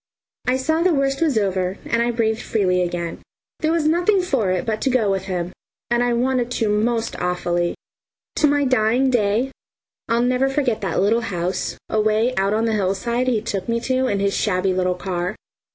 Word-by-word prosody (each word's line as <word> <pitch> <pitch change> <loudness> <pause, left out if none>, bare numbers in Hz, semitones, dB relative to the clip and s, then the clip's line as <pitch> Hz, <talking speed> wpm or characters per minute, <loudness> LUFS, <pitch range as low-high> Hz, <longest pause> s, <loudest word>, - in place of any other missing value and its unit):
I 255 +1 +3
saw 315 +5 0
the 350 -2 +3
worst 275 +1 0
was 305 -8 +2
over, 190 -2 0
and 230 - +1
I 235 - +1
breathed 225 -1 0
freely 185 -4 +1
again. 170 -1 -3 0.4
There 315 - +1
was 330 -2 +1
nothing 350 +6 +3
for 265 - 0
it 185 -1 0
but 220 -2 -2
to - - +1
go 235 -6 +2
with 190 -1 -2
him, 180 -2 -3 0.4
and 240 0 +3
I 245 - +1
wanted 245 0 +1
to 225 -3 0
most 225 +2 0
awfully. 175 -1 0 0.6
To 305 - +4
my 290 0 +2
dying 255 +1 +2
day 230 +2 +1 0.6
I'll 230 +1 +2
never 255 +2 +2
forget 270 -5 0
that 190 -4 -1
little 225 +4 +3
house, 180 -4 -3
away 215 +3 +1
out 195 +1 +1
on 225 +1 +1
the 225 - +1
hillside, 215 +5 0
he 235 -4 +1
took 205 -2 -3
me 230 0 +1
to 260 +1 0
in 200 -4 0
his 200 0 +1
shabby 185 -2 +1
little 180 0 0
car. 180 +1 -3
225 Hz, 195 wpm, -21 LUFS, 195-255 Hz, 0.6 s, To